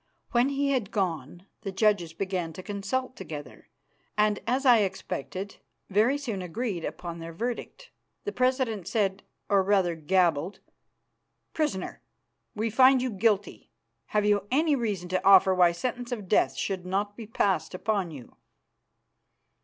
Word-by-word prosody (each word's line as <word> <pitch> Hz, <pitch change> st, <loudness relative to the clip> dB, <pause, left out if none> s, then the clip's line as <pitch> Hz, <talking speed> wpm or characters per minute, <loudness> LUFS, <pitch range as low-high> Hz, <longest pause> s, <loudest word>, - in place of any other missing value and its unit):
When 245 Hz, +3 st, +3 dB
he 280 Hz, 0 st, 0 dB
had 245 Hz, -8 st, 0 dB
gone 175 Hz, -, -3 dB, 0.2 s
the 195 Hz, -, -4 dB
judges 195 Hz, -4 st, +2 dB
began 180 Hz, -1 st, -3 dB
to 185 Hz, -, -9 dB
consult 210 Hz, +7 st, -3 dB
together, 145 Hz, -2 st, -9 dB, 0.5 s
and, 210 Hz, -1 st, +3 dB
as 260 Hz, +4 st, 0 dB
I 245 Hz, -3 st, +7 dB
expected, 190 Hz, -1 st, -4 dB, 0.3 s
very 220 Hz, +8 st, +3 dB
soon 230 Hz, -9 st, -4 dB
agreed 180 Hz, 0 st, -3 dB
upon 170 Hz, 0 st, -5 dB
their 165 Hz, 0 st, -7 dB
verdict. 240 Hz, -, -5 dB, 0.3 s
The 415 Hz, -, -3 dB
president 255 Hz, -, 0 dB
said, 195 Hz, -3 st, 0 dB, 0.3 s
or 200 Hz, -1 st, +4 dB
rather 190 Hz, -3 st, +2 dB
gabbled, 170 Hz, +1 st, +1 dB, 0.9 s
"Prisoner, 295 Hz, -, -2 dB, 0.5 s
we 220 Hz, +1 st, -1 dB
find 260 Hz, +3 st, +6 dB
you 255 Hz, 0 st, -1 dB
guilty. 205 Hz, -1 st, 0 dB, 0.4 s
Have 210 Hz, -1 st, +1 dB
you 205 Hz, -1 st, +2 dB
any 300 Hz, +3 st, +3 dB
reason 210 Hz, -8 st, -2 dB
to 185 Hz, 0 st, 0 dB
offer 190 Hz, -1 st, +7 dB
why 180 Hz, -2 st, +5 dB
sentence 245 Hz, +7 st, -4 dB
of 215 Hz, -6 st, -4 dB
death 205 Hz, -, +3 dB
should 190 Hz, -3 st, -2 dB
not 200 Hz, +3 st, -2 dB
be 225 Hz, -1 st, -9 dB
passed 195 Hz, -5 st, 0 dB
upon 200 Hz, -2 st, -1 dB
you?" 140 Hz, -6 st, -11 dB
200 Hz, 145 wpm, -27 LUFS, 185-240 Hz, 0.9 s, I